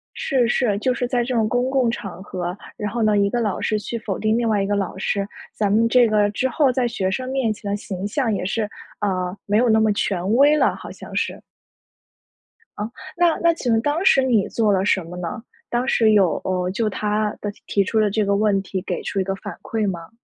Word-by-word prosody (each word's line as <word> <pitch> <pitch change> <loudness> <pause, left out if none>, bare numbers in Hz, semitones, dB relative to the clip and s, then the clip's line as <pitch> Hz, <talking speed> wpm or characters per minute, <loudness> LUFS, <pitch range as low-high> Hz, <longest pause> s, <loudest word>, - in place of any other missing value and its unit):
是 250 -4 +1
是， 225 -5 +1
就 255 +4 +1
是 245 0 -2
在 245 -1 0
这 250 +1 -2
种 220 -2 +2
公 245 +3 0
共 260 -4 +2
场 195 -5 -6
合， 180 -1 -4 0.2
然 210 -1 -3
后 235 0 -1
呢， 215 -1 +3
一 200 0 +3
个 240 - 0
老 210 -4 -1
师 215 - 0
去 235 - -5
否 205 -4 -4
定 215 +1 +1
另 235 -1 +1
外 210 -2 +2
一 - - -1
个 205 - 0
老 200 -2 -2
师， 200 0 -1 0.3
咱 205 -2 0
们 225 +2 +4
这 245 0 +5
个 210 -1 +3
之 250 +5 0
后 270 0 +2
在 250 0 +1
学 190 -5 -1
生 255 +7 -3
面 260 -4 +1
前 205 -1 -6
的 200 - 0
形 200 -2 -5
象 230 +1 0
也 190 - -2
是， 210 +3 -1 0.3
呃， 185 -2 -1
没 205 - +1
有 245 - +3
那 220 0 +4
么 220 -1 +3
权 195 0 0
威 285 +4 +5
了， - - +3
好 - - -9
像 - - -10
是。 - - -2 1.4
啊， 210 +2 -3 0.3
那 345 -2 +3
那 335 0 +5
请 250 -7 -1
问 225 - +3
当 295 +7 0
时 270 - +5
你 235 -6 +2
做 220 -3 +1
了 190 0 +2
什 190 -3 +2
么 170 +2 -9
呢？ 180 +4 -5 0.3
当 240 +1 -1
时 225 -5 +4
有， 190 -7 +3
呃， 180 -1 -1
就 215 +3 0
他 210 +1 -1
的 205 - -3 0.2
提 200 -1 +2
出 220 +3 +1
的 210 -1 +2
这 215 +1 +1
个 200 0 +2
问 205 -1 +2
题 190 -1 -4
给 - - -3
出 195 - -2
一 - - 0
个 195 +1 -2
反 - - -8
馈 220 -2 -1
吗？ 170 -2 -7
215 Hz, 260 characters per minute, -22 LUFS, 195-240 Hz, 1.4 s, 这